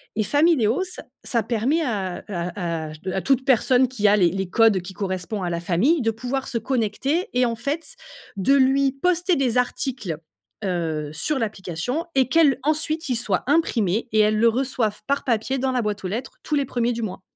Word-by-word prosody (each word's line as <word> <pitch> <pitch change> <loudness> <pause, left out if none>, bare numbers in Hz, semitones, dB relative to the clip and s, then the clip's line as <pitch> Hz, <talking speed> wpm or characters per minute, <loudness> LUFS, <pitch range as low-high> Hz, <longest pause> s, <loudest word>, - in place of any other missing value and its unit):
et 215 - +1
Famileo, 290 - +3
ça 365 -1 -7 0.2
ça 235 - 0
permet 245 +9 0
à, 200 - -2
heu - - -15
à 170 -4 -3
à - - -8 0.2
à 190 - -1
toute 270 -1 +1
personne 260 0 +4
qui 235 -4 0
a 205 +1 +5
les 180 -3 +4
les 195 +1 -3
codes 220 -3 +4
qui 185 +2 -9
correspond 190 +2 -3
à 175 - -1
la 170 0 -3
famille 215 - +2
de 225 -1 +1
pouvoir 250 +4 -4
se 240 - -1
connecter 260 - -1
et 250 0 +3
en 230 - -1
fait 285 +8 -4 0.4
de 200 +8 +2
lui 270 0 +4
poster 355 +5 +1
des 255 -3 +1
articles, 245 - -2 0.5
heu, 160 -5 -2
sur 270 - 0
l'application 215 - -3
et 260 -2 +4
qu'elle, 285 -3 +4
ensuite 310 +2 +1
ils 250 - +1
soient 205 -5 +1
imprimés 235 - +1
et 215 - +2
elles 215 0 +4
le 230 +2 +5
reçoivent 245 -3 -1
par 280 +1 0
papier 250 +2 0
dans 265 0 0
la 250 -1 0
boîte 210 -2 -3
aux - - -2
lettres 235 +6 -5
tous 305 - -1
les 285 -1 +1
premiers 240 -1 -1
du 235 - -4
mois. 190 -3 -5
235 Hz, 205 wpm, -23 LUFS, 200-270 Hz, 0.5 s, a